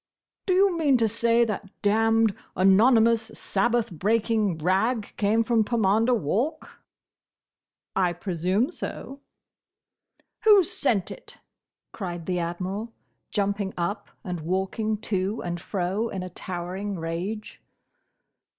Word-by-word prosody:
"Do 370 - +3
you 385 -1 +4
mean 295 -6 +3
to 225 -2 +2
say 230 +2 +2
that 210 -3 -4
damned, 225 +1 +3 0.2
anonymous, 225 +4 +5
Sabbath 230 +2 0
breaking 210 +1 +1
rag 200 +7 0
came 220 +2 +2
from 225 -1 +2
Pomander 225 +2 +2
Walk?" 240 - -2 1.2
"I 185 -2 +2
presume 185 - -1
so." 275 -5 -7 1.3
"Who 415 -3 +8
sent 230 - -1
it?" - - -12 0.5
cried 175 -5 -6
the 180 -1 -1
Admiral, 185 +6 -4 0.4
jumping 200 -1 -1
up 175 +4 -3
and 180 -2 -4
walking 190 +6 -1
to 195 0 -2
and 175 -1 -4
fro 195 +5 -2
in 190 -3 -4
a 185 - -7
towering 185 +3 -4
rage. 175 +6 -5
205 Hz, 115 wpm, -26 LUFS, 185-230 Hz, 1.3 s, Who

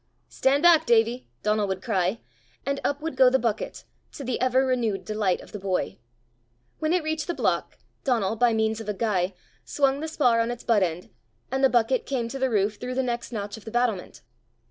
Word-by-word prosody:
"Stand 280 +3 +1
back, 330 -4 +6
Davie," 235 +1 +2 0.2
Donal 210 -1 +1
would 190 -1 -3
cry, 195 -1 0 0.4
and 280 0 -1
up 285 +1 -1
would 325 - -3
go 260 -1 +6
the 265 - +3
bucket, 230 -3 -2 0.3
to 285 - -7
the 250 -2 -2
ever 255 +1 +3
renewed 235 -6 0
delight 210 -4 0
of - - -14
the 210 - -6
boy. 190 -1 -2 0.8
When 310 0 0
it 355 -2 +2
reached 310 -1 -2
the 345 - -2
block, - - -1 0.3
Donal, 225 -6 +1
by 240 +1 +3
means 220 0 0
of 215 - -7
a 210 - -1
guy, 190 -4 0 0.3
swung 275 -1 +1
the 315 - -3
spar 255 -7 +2
on 230 +1 +1
its 240 0 -5
but 225 -4 +3
end, 175 -1 -2 0.4
and 265 +1 0
the 270 - +6
bucket 245 +1 +1
came 250 -4 -1
to 270 - -5
the 265 0 +1
roof 205 -2 +1
through 250 +3 -5
the 265 - +1
next 240 -1 -3
notch 205 -2 -4
of 220 - -13
the - - -6
battlement. 235 -5 -1
235 Hz, 210 wpm, -26 LUFS, 210-265 Hz, 0.8 s, back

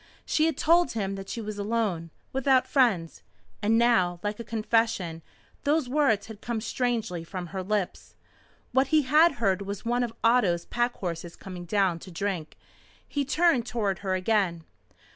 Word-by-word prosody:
She 310 +1 +2
had 320 -4 -1
told 340 +2 +3
him 195 -4 -2
that 195 0 -7
she 230 - -4
was 210 -1 -6
alone 200 -6 -1 0.2
without 265 -1 +3
friends. 220 - +1 0.4
And 220 +2 +3
now, 190 -8 +3
like 210 +1 -3
a - - -4
confession, 220 -6 0 0.4
those 295 -1 +2
words 250 -6 +2
had 220 -2 -11
come 235 -1 -2
strangely 225 -7 -2
from 180 +1 -6
her 190 - -2
lips. 200 0 -3 0.6
What 265 +1 +3
he 305 +1 +3
had 305 +6 +5
heard 200 -5 0
was 200 +1 -6
one 240 +1 +1
of 240 -2 -1
Otto's 205 -8 +3
pack 240 0 -1
horses 170 -2 -5
coming 180 -2 -8
down 185 -2 +1
to 185 - -11
drink. 180 -2 -4 0.5
He 285 - -1
turned 295 -4 +2
toward 205 -7 -1
her 190 -2 -1
again. 185 -4 +1
215 Hz, 165 wpm, -27 LUFS, 185-245 Hz, 0.6 s, had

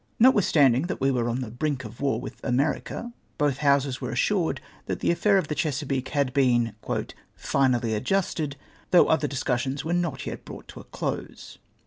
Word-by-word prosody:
Notwitlistanding 165 - +5
that - - -4
we 135 +1 +2
were 120 -2 0
on 120 +2 -1
tlie 115 -2 -6
brink 145 -4 -1
of 110 +4 -10
war 135 -6 +1
with 130 - -9
America, 145 - -1 0.2
both 145 -3 +1
Houses 140 -2 +2
were 125 - -3
assured 165 - +1 0.3
that - - -2
the - - +2
affair 200 +3 +3
of 185 -5 0
the 150 - -2
Chesapeake 140 -4 -1
had 140 -3 0
been 120 -4 +2 0.3
" - - -13 0.2
finally 125 -4 +1
adjusted, 150 - -1 0.3
though 180 - +6
other 160 -2 +2
discussions 135 +1 -2
were 165 - -1
not 170 -7 -1
yet - - -6
brouglit - - -10
to - - -10
a - - -12
close." - - -5
140 Hz, 180 wpm, -26 LUFS, 125-160 Hz, 0.3 s, though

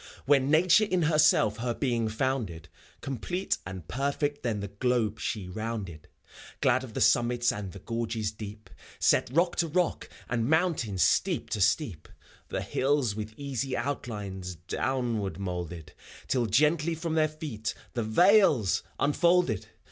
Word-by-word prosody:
When 135 -1 +3
Nature 170 +7 +5
in 185 -4 0
herself 150 -9 +4
her 120 0 -2
being 120 -5 0
founded. 110 - -2 0.3
Complete 175 - -2
and 90 -4 -8
perfect 140 +2 -1
then 115 -4 -1
the 100 - -4
globe 110 0 0
she 105 -5 -3
rounded, 100 -5 -5 0.5
Glad 130 +1 +2
of 115 -4 -10
the - - -1
summits 120 0 +3
and 100 -3 -5
the 100 - -10
gorges 115 0 -3
deep, 105 -2 -10 0.3
Set - - +3
rock 170 +5 +2
to 170 - +2
rock, 175 +2 -1 0.2
and 115 0 -1
mountain 160 - +1
steep 90 - +1
to 105 - -1
steep. 100 - +1 0.4
The - - -2
hills 135 -4 +1
with 110 0 -6
easy 135 -2 -3
outlines 105 -8 -4
downward 115 +4 -2
moulded, 90 -4 -5 0.3
Till 125 -3 +1
gently 150 - +2
from 165 0 -3
their 155 -1 +3
feet 145 -9 -5 0.2
the 120 - -1
vales 145 - +4 0.2
unfolded 145 - +2
120 Hz, 140 wpm, -28 LUFS, 105-145 Hz, 0.5 s, Nature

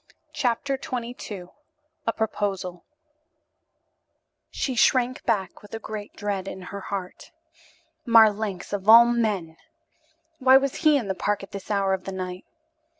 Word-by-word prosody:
CHAPTER 270 0 -1
XXII 235 -6 -5 0.6
A 230 - +2
PROPOSAL 195 -5 -3 1.7
She 265 - -2
shrank 255 +1 +2
back 210 -5 -1
with 205 +2 -9
a - - -5
great 215 -2 -7
dread 200 -2 -3
in 190 - -6
her 200 - -4
heart. 190 -2 -6 0.7
Marlanx, 215 -6 +3
of 200 +1 -2
all 230 +1 +10
men! 210 -9 -1 0.8
Why 260 0 +7
was 275 0 -1
he 305 -3 +4
in 235 -7 -3
the 190 - 0
park 205 +2 -1
at 195 - -11
this 200 -1 -8
hour 200 -2 +1
of 190 -1 -3
the 195 - -4
night? 185 -1 -6
210 Hz, 140 wpm, -25 LUFS, 195-240 Hz, 1.7 s, all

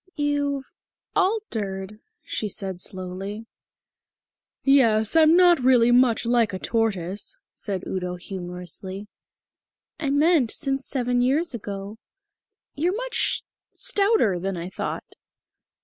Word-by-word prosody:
"You've 285 -1 0 0.5
altered," 215 - -1 0.2
she 215 - -3
said 190 -2 -5
slowly. 190 +4 -5 1.2
"Yes, 230 -4 +4
I'm 320 +1 +6
not 355 -3 +6
really 245 -2 +5
much 245 -2 +4
like 235 -3 +2
a - - -2
tortoise," 200 -3 -2 0.2
said 195 -3 -4
Udo 180 -1 -3
humorously. 180 +1 -6 0.9
"I 295 -4 -1
meant 290 -2 +3
since 270 +1 -1
seven 245 -2 +1
years 280 +6 +1
ago. 205 -1 -6 0.7
You're 345 +6 0
much - - -1 0.3
stouter 410 - +2
than 190 +1 -3
I 170 +2 -5
thought." - - -5
230 Hz, 105 wpm, -24 LUFS, 195-285 Hz, 1.2 s, I'm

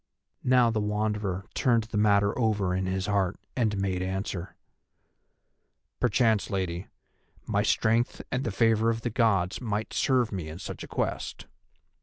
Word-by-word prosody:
Now 125 -2 +4
the 110 - 0
Wanderer 105 -2 -1
turned 120 -4 +2
the 110 0 -5
matter 100 -1 +3
over 105 -6 +1
in 95 0 -1
his 95 0 -1
heart 100 -2 0 0.2
and 110 -5 +1
made 95 -2 -1
answer: 95 -1 -3 1.4
"Perchance, 115 -3 +2
Lady, 95 -2 -2 0.6
my - - +1
strength 115 +2 +1
and 130 +1 0
the - - -1
favour 115 +2 +3
of 115 0 -1
the 120 - -2
Gods 100 -5 +1
might 110 -2 -2
serve 125 -4 +2
me 90 -6 -4
in 80 - -7
such - - -7
a - - -8
quest. - - -3
105 Hz, 150 wpm, -28 LUFS, 95-115 Hz, 1.4 s, Now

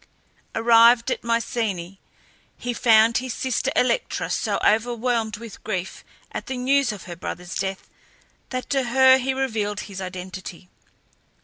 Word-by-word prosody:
Arrived 230 +1 +5
at - - -2
Mycenae, 220 -6 -2 0.6
he 245 0 -3
found 225 -1 +5
his 255 -1 -5
sister 260 -2 -1
Electra 465 - 0
so - - 0
overwhelmed 230 0 +1
with 230 -1 -11
grief 185 0 -4 0.3
at - - -6
the 260 -2 -3
news 265 0 +2
of 210 - -8
her 175 - -8
brother's 180 +1 -6
death 190 0 -3 0.6
that 255 -1 -4
to 270 -2 +1
her 260 +2 +6
he 265 +1 -1
revealed 220 -6 -2
his 195 -2 -8
identity. 185 -1 -8
230 Hz, 135 wpm, -23 LUFS, 195-250 Hz, 0.6 s, her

